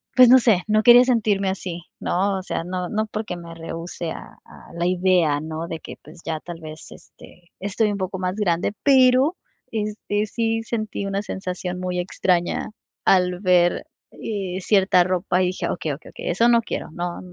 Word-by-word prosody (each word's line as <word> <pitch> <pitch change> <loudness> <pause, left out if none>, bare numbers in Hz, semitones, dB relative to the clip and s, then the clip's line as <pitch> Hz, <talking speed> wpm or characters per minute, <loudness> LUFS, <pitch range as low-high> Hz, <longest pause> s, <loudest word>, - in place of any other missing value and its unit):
pues 255 -2 +8
no 260 +1 +8
sé, 215 -7 +3
no 215 0 +3
quería 240 +2 +8
sentirme 210 -6 +1
así, 180 -2 -5 0.2
¿no? 195 +2 0
O 185 - -8
sea, 170 - -3
no, 180 0 -4
no 215 +1 -1
porque 210 -4 -5
me 170 -1 -10
rehúse 165 0 -6
a - - -10
a - - -15
la 170 +1 -1
idea, 180 -5 +2
¿no?, 160 +1 -5
de 165 - -5
que, - - -10
pues 160 +4 -14
ya 160 -1 -2
tal 170 +1 -9
vez, 155 -1 -10
este, 175 0 -16
estoy 205 +2 0
un 205 - -3
poco 190 0 -3
más 185 0 -2
grande, 190 -2 0
pero, 265 +4 +5 0.3
este, 210 -1 -2
sí 225 +1 -1
sentí 215 -3 -3
una 195 0 -1
sensación 180 -2 -5
muy 180 -1 -2
extraña 175 +1 0 0.3
al 180 -1 +3
ver 180 -2 +3 0.3
eh 195 -4 -4
cierta 190 -2 +4
ropa 185 0 0
y - - +2
dije: 180 - -3
"Okey, 160 -3 -2
okey, 140 +2 -8
okey, - - -6
eso 210 +7 +3
no 235 -1 +5
quiero, - - -5
no, 175 +1 -4
185 Hz, 185 wpm, -22 LUFS, 175-215 Hz, 0.3 s, pues